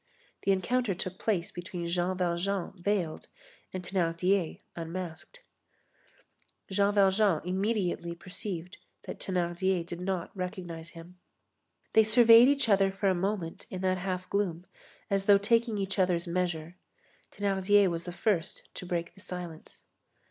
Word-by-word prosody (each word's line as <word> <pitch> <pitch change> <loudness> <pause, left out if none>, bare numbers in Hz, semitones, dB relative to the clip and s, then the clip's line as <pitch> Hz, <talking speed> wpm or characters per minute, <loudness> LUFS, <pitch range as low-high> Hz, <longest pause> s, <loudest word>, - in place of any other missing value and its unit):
The 195 - +2
encounter 205 +2 +1
took 185 +1 -5
place 185 -6 0
between 175 -1 -5
Jean 175 +2 0
Valjean 180 +1 -1
veiled 180 -3 -2 0.4
and 185 -1 -5
Thénardier 180 0 0
unmasked. 175 - -6 1.3
Jean 200 +1 +2
Valjean 195 -3 +4
immediately 185 -3 -1
perceived 180 0 -6 0.3
that - - -7
Thénardier 180 0 0
did 175 +1 -7
not 185 -1 -3
recognize 180 -3 -5
him. 175 +2 -12 0.7
They 220 - +7
surveyed 230 +2 +8
each 280 -2 +2
other 195 -2 +4
for 195 +1 0
a - - +3
moment 185 -2 -3
in 185 - -5
that 185 -1 +1
half 185 0 -3
gloom, 185 -4 -1 0.5
as 195 0 +1
though 200 0 +7
taking 230 +2 +2
each 195 0 -2
other's 180 -2 +2
measure. 175 -1 -2 0.5
Thénardier 200 0 +3
was 170 -1 -3
the 175 - -5
first 175 -1 -1
to 180 - -7
break 170 -1 -2
the 195 - -16
silence. 175 -4 -8
185 Hz, 135 wpm, -30 LUFS, 175-200 Hz, 1.3 s, surveyed